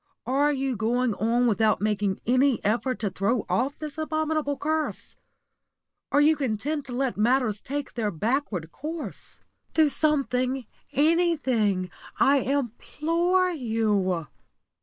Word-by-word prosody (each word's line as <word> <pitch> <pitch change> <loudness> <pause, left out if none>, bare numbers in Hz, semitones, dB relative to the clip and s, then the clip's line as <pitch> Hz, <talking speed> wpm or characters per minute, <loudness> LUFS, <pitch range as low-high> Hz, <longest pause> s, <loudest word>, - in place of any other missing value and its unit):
Are 280 +3 +2
you 270 -2 -1
going 235 +2 +1
on 230 +4 +1
without 220 -1 +2
making 205 -2 -1
any 255 +1 +3
effort 240 +4 0
to 205 -3 -1
throw 205 +4 0
off 250 +11 0
this 305 -1 -7
abominable 310 -2 -1
curse? 310 +2 -2 1.0
Are 285 - +4
you 310 +2 +5
content 280 +2 -2
to - - -8
let 260 -2 -1
matters 225 -1 +2
take 285 +1 -5
their 225 -3 -1
backward 205 - -2
course? 315 - -7 0.3
Do 315 -2 +5
something 270 -4 0 0.3
anything, 265 - +2 0.3
I 280 +1 +5
implore 325 - 0
you. 215 - 0
255 Hz, 120 wpm, -26 LUFS, 220-295 Hz, 1.0 s, you